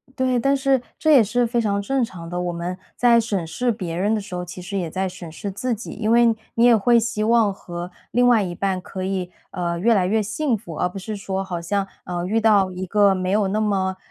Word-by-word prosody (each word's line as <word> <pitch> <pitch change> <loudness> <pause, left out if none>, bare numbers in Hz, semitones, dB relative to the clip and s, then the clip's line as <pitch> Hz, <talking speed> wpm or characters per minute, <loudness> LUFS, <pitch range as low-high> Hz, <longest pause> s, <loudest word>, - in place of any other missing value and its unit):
对， 255 -2 +1
但 275 +4 +2
是 270 -2 +2 0.2
这 315 - +2
也 260 -6 +7
是 240 +4 +1
非 235 0 0
常 200 -2 0
正 270 +4 0
常 170 -7 -6
的。 175 0 -3
我 175 0 -2
们 175 +2 -4 0.2
在 240 -1 +5
审 205 -6 -1
视 240 +10 -1
别 185 -7 -4
人 200 +5 +1
的 220 - +1
时 195 -2 -9
候， 180 - -3
其 180 +1 -8
实 195 +3 -4
也 175 -4 -2
在 190 +3 -2
审 175 -3 -9
视 200 +5 -5
自 240 +5 -2
己， 225 +3 -7
因 220 0 -1
为 235 0 +6 0.3
你 230 - +4
也 240 -1 +7
会 235 +3 +4
希 220 -2 -2
望 225 -2 +3
和 175 -1 -7 0.2
另 245 +1 +3
外 235 -3 +5
一 175 -2 -4
半 190 -1 -1
可 185 +1 -6
以， 185 -2 -2 0.2
呃， 170 -2 -2
越 230 +4 +4
来 185 -3 +2
越 220 +3 +2
幸 225 +5 -1
福， 170 -6 -9
而 180 - 0
不 180 - -9
是 215 +3 -5
说 195 -1 -3
好 175 -3 -4
像， 195 +3 -1 0.2
呃， 175 -1 -3
遇 220 +5 +1
到 205 -4 +4
一 185 +1 -5
个 200 +1 +4
没 185 -1 -2
有 205 0 +2
那 215 +2 0
么， 190 -3 0
200 Hz, 270 characters per minute, -22 LUFS, 180-230 Hz, 0.3 s, 也